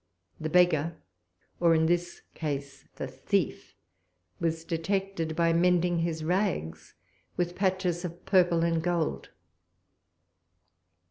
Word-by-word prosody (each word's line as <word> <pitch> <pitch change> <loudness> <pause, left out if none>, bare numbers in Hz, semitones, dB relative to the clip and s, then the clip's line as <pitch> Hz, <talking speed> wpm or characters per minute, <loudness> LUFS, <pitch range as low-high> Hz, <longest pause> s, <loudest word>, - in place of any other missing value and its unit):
The 155 - -3
beggar, 170 -2 +3 0.6
or 170 -1 +5
in 160 0 +3
this 175 +1 -1
case 140 -3 -5
the - - -4
thief, - - -2 0.6
was 165 -1 -1
detected 170 -1 -2
by 170 0 +3
mending 175 0 +3
his 165 -1 -2
rags 120 - -1 0.4
with 175 0 -1
patches 185 -2 0
of 175 0 -7
purple 175 -3 +4
and 165 -1 +1
gold. 170 -1 -1
170 Hz, 110 wpm, -28 LUFS, 160-180 Hz, 0.6 s, or